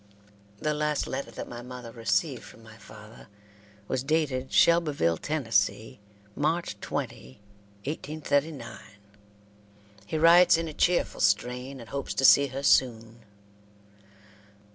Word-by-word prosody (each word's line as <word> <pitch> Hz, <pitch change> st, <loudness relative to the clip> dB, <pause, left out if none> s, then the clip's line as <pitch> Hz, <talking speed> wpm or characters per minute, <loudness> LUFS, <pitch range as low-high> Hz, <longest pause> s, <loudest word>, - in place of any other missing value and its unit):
The 150 Hz, +7 st, -1 dB
last 150 Hz, -1 st, -1 dB
letter 140 Hz, -, -5 dB
that -, -, -8 dB
my 120 Hz, 0 st, -8 dB
mother 125 Hz, -1 st, -9 dB
received 115 Hz, +4 st, -1 dB
from 115 Hz, -, -15 dB
my 110 Hz, 0 st, -14 dB
father 110 Hz, 0 st, -14 dB, 0.6 s
was 130 Hz, -, -1 dB
dated 135 Hz, -4 st, -1 dB
Shelbyville, 170 Hz, -, +3 dB
Tennessee, 115 Hz, -, -1 dB, 0.4 s
March 155 Hz, -7 st, -1 dB
20, 65 Hz, -8 st, -6 dB, 0.5 s
1839. 150 Hz, 0 st, -3 dB, 1.3 s
He 155 Hz, -, -2 dB
writes 170 Hz, +2 st, +6 dB
in 165 Hz, 0 st, -3 dB
a 155 Hz, -, -7 dB
cheerful 175 Hz, +3 st, 0 dB
strain, 125 Hz, +6 st, 0 dB
and 115 Hz, -, -11 dB
hopes 140 Hz, -1 st, -4 dB
to 135 Hz, -, +1 dB
see 140 Hz, +1 st, +7 dB
her 135 Hz, +1 st, -6 dB
soon. 115 Hz, -4 st, +2 dB
135 Hz, 120 wpm, -27 LUFS, 115-155 Hz, 1.3 s, see